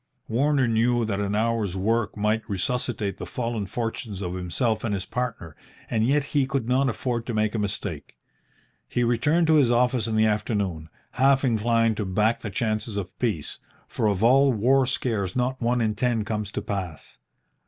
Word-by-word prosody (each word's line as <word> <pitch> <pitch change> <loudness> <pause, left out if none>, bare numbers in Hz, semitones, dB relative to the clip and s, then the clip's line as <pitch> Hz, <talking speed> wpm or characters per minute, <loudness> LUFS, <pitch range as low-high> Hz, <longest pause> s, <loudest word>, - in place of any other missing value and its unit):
Warner 135 +2 +2
knew 115 +1 +2
that 100 -2 -2
an 100 0 -1
hour's 110 -4 0
work 110 +3 0
might 105 +2 +1
resuscitate 105 +1 -2
the - - -5
fallen 115 -4 -3
fortunes 115 -3 -4
of 90 -1 -3
himself 95 +6 -1
and 105 -3 0
his 95 0 -4
partner, 115 - -4 0.4
and 110 -1 +1
yet 140 +5 +2
he 140 -3 +2
could 135 -4 -2
not 130 +2 +2
afford 120 0 -3
to 120 - -2
make 110 0 +1
a 115 - -1
mistake. 100 -6 -4 0.7
He 120 - 0
returned 145 +9 +2
to 160 -1 +5
his 135 -5 +4
office 120 -1 +2
in 110 - -1
the 110 0 +4
afternoon, 100 -7 -1 0.2
half 135 +2 +3
inclined 115 -1 +2
to 105 - -2
back 105 +5 +1
the 110 - -4
chances 110 +1 -2
of 100 -3 -6
peace, 105 - -2 0.3
for 110 - -1
of 100 0 0
all 135 +3 +5
war 130 +4 +3
scares 110 -7 -1
not 130 +1 -1
one 120 +1 +1
in 110 -1 +1
ten 115 -1 0
comes 105 -1 -3
to - - -3
pass. 95 -6 -5
115 Hz, 185 wpm, -25 LUFS, 105-125 Hz, 0.7 s, to